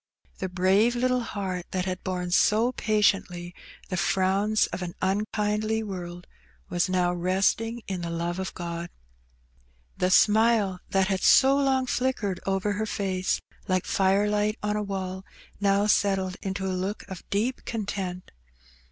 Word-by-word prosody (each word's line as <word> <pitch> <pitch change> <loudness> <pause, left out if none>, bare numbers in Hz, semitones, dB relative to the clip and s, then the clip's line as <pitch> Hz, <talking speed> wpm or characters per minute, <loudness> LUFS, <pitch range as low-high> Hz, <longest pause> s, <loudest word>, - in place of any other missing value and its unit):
The 190 - -2
brave 190 +6 +3
little 250 +1 +2
heart 190 -6 -4
that 185 -1 -2
had 185 -1 -4
borne 180 -1 -3
so 220 +6 +4
patiently 195 -6 0 0.4
the 185 - -2
frowns 195 +4 +2
of - - -4
an 175 -1 -5
unkindly 210 +2 0
world, 175 -3 -6 0.4
was 175 +2 0
now 180 -1 +2
resting 195 +6 0
in 185 -2 -4
the 170 - -4
love 170 +2 -2
of 190 - -4
God. 170 -1 -5 1.1
The 180 - +1
smile 210 -1 +4
that 190 0 +2
had 190 -1 0
so 270 +1 +6
long 270 -2 +2
flickered 250 -7 -1
over 195 +1 0
her 215 +2 -2
face 190 -3 -1 0.3
like 185 -1 +1
firelight 205 +2 +2
on 210 0 0
a 210 - 0
wall, 190 -2 -4 0.4
now 200 0 +3
settled 195 -3 +2
into 195 -1 -3
a 190 - -1
look 190 +3 -3
of 190 -2 -7
deep 225 +6 -1
content. 195 -5 -4
195 Hz, 145 wpm, -26 LUFS, 185-210 Hz, 1.1 s, so